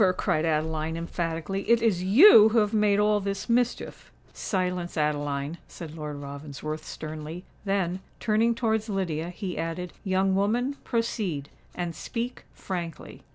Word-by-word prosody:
cried 155 Hz, +1 st, +1 dB
Adeline, 160 Hz, 0 st, 0 dB
emphatically. 170 Hz, +2 st, -3 dB
"It 235 Hz, 0 st, +6 dB
is 220 Hz, -6 st, +2 dB
you 220 Hz, -, +8 dB
who 225 Hz, -, +1 dB
have 210 Hz, -1 st, +3 dB
made 210 Hz, -2 st, +3 dB
all 210 Hz, 0 st, +3 dB
this 195 Hz, 0 st, -3 dB
mischief!" 245 Hz, 0 st, -1 dB, 0.2 s
"Silence, 180 Hz, -3 st, -2 dB
Adeline," 145 Hz, 0 st, -1 dB
said 160 Hz, -3 st, -9 dB
Lord 150 Hz, -2 st, -5 dB
Ravensworth, 145 Hz, +2 st, -6 dB
sternly; 155 Hz, +3 st, -7 dB, 0.2 s
then, 190 Hz, -2 st, 0 dB, 0.2 s
turning 225 Hz, +2 st, +2 dB
towards 220 Hz, -2 st, 0 dB
Lydia, 175 Hz, -5 st, -2 dB
he 180 Hz, 0 st, -5 dB
added, 165 Hz, +2 st, -4 dB
"Young 190 Hz, 0 st, +2 dB
woman, 235 Hz, +8 st, +1 dB
proceed—and 175 Hz, -, -3 dB
speak 235 Hz, +8 st, -5 dB
frankly." 170 Hz, -4 st, -6 dB
180 Hz, 130 wpm, -27 LUFS, 160-210 Hz, 0.2 s, you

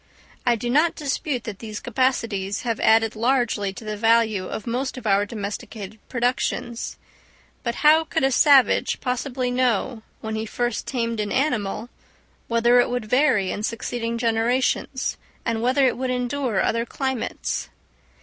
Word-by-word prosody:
I 240 Hz, -, +5 dB
do 235 Hz, +2 st, -4 dB
not 300 Hz, +7 st, +3 dB
dispute 280 Hz, -3 st, -2 dB
that 210 Hz, -4 st, -7 dB
these 215 Hz, -2 st, -6 dB
capacities 230 Hz, -5 st, -1 dB
have 230 Hz, -3 st, -1 dB
added 225 Hz, 0 st, +4 dB
largely 230 Hz, -4 st, +1 dB
to 225 Hz, +2 st, -10 dB
the 215 Hz, 0 st, -3 dB
value 220 Hz, -3 st, +2 dB
of 215 Hz, -, -5 dB
most 255 Hz, +3 st, -2 dB
of 250 Hz, -, -8 dB
our 200 Hz, 0 st, +3 dB
domesticated 210 Hz, 0 st, -6 dB
productions; 240 Hz, -1 st, -1 dB, 0.6 s
but 235 Hz, -1 st, -2 dB
how 315 Hz, +2 st, +7 dB
could 320 Hz, -2 st, -1 dB
a 270 Hz, -, +3 dB
savage 275 Hz, 0 st, +4 dB
possibly 250 Hz, 0 st, -2 dB
know, 245 Hz, -2 st, 0 dB, 0.2 s
when 220 Hz, 0 st, -5 dB
he 220 Hz, 0 st, -3 dB
first 240 Hz, +1 st, -2 dB
tamed 230 Hz, -3 st, -2 dB
an 205 Hz, -1 st, -2 dB
animal, 240 Hz, -5 st, -1 dB, 0.6 s
whether 235 Hz, +1 st, +4 dB
it 245 Hz, -, +3 dB
would 245 Hz, -2 st, -2 dB
vary 250 Hz, -5 st, +2 dB
in 205 Hz, -, -4 dB
succeeding 230 Hz, +1 st, -3 dB
generations, 240 Hz, +3 st, 0 dB, 0.3 s
and 230 Hz, -1 st, -1 dB
whether 260 Hz, +3 st, +3 dB
it 255 Hz, -, +2 dB
would 260 Hz, 0 st, -1 dB
endure 250 Hz, -3 st, 0 dB
other 230 Hz, +1 st, +1 dB
climates? 265 Hz, +1 st, -3 dB
235 Hz, 150 wpm, -23 LUFS, 220-255 Hz, 0.6 s, how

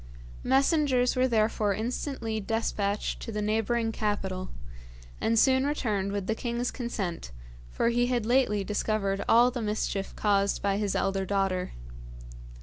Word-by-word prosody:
Messengers 270 Hz, -2 st, +3 dB
were 255 Hz, 0 st, +3 dB
therefore 215 Hz, -3 st, +1 dB
instantly 230 Hz, 0 st, -3 dB
despatched 205 Hz, -1 st, -1 dB
to -, -, -5 dB
the 210 Hz, -, -3 dB
neighbouring 225 Hz, +2 st, 0 dB
capital, 195 Hz, -4 st, -2 dB, 0.7 s
and 225 Hz, 0 st, +2 dB
soon 260 Hz, +3 st, +4 dB
returned 215 Hz, -9 st, -1 dB
with 200 Hz, -1 st, -2 dB
the 220 Hz, -, 0 dB
king's 240 Hz, +1 st, -2 dB
consent, 195 Hz, -, -4 dB, 0.4 s
for 230 Hz, -, +1 dB
he 240 Hz, +1 st, +2 dB
had 245 Hz, -3 st, 0 dB
lately 235 Hz, -4 st, +2 dB
discovered 200 Hz, -1 st, -1 dB
all 240 Hz, +2 st, +6 dB
the 245 Hz, -1 st, -4 dB
mischief 210 Hz, -2 st, -2 dB
caused 200 Hz, -1 st, +1 dB
by 200 Hz, -1 st, 0 dB
his 205 Hz, -2 st, -1 dB
elder 195 Hz, 0 st, 0 dB
daughter. 190 Hz, -1 st, -1 dB
215 Hz, 140 wpm, -28 LUFS, 200-240 Hz, 0.7 s, all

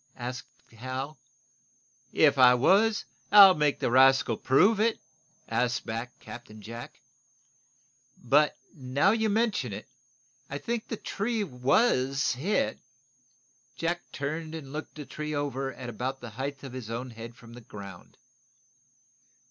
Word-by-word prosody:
gasped 125 Hz, +1 st, -8 dB
Hal. 130 Hz, +6 st, -6 dB, 0.9 s
"If 145 Hz, -3 st, +4 dB
I 125 Hz, -1 st, +8 dB
was, 200 Hz, -, +3 dB, 0.3 s
I'll 200 Hz, -2 st, +10 dB
make 150 Hz, -3 st, +1 dB
the -, -, -1 dB
rascal 130 Hz, -2 st, +5 dB
prove 190 Hz, -, +3 dB
it," 225 Hz, +1 st, +2 dB, 0.5 s
asked 120 Hz, +1 st, -1 dB
back 115 Hz, +2 st, -5 dB
Captain 110 Hz, -3 st, -11 dB
Jack. 115 Hz, +3 st, -9 dB, 1.2 s
"But, 145 Hz, +5 st, +3 dB, 0.2 s
now 140 Hz, +6 st, +1 dB
you 220 Hz, 0 st, +1 dB
mention 210 Hz, -, 0 dB
it, 105 Hz, +5 st, -8 dB, 0.6 s
I 140 Hz, -, -4 dB
think 230 Hz, +8 st, -4 dB
the 225 Hz, -, -4 dB
tree 220 Hz, +2 st, -2 dB
was 135 Hz, -, +1 dB
hit." 135 Hz, -, -1 dB, 1.0 s
Jack 170 Hz, +1 st, -1 dB
turned 155 Hz, +3 st, -4 dB
and 140 Hz, -4 st, -8 dB
looked 155 Hz, +1 st, -6 dB
the 150 Hz, -2 st, -8 dB
tree 150 Hz, +2 st, -5 dB
trunk 145 Hz, -1 st, 0 dB
over 135 Hz, -1 st, -3 dB
at 130 Hz, -1 st, -9 dB
about 125 Hz, +3 st, -4 dB
the 120 Hz, -3 st, -9 dB
height 135 Hz, +4 st, -5 dB
of 135 Hz, -3 st, -8 dB
his 125 Hz, -4 st, -7 dB
own 120 Hz, +2 st, -5 dB
head 115 Hz, +1 st, -9 dB
from 115 Hz, -2 st, -15 dB
the 120 Hz, -, -11 dB
ground. 100 Hz, -5 st, -11 dB
135 Hz, 140 wpm, -28 LUFS, 120-160 Hz, 1.2 s, I'll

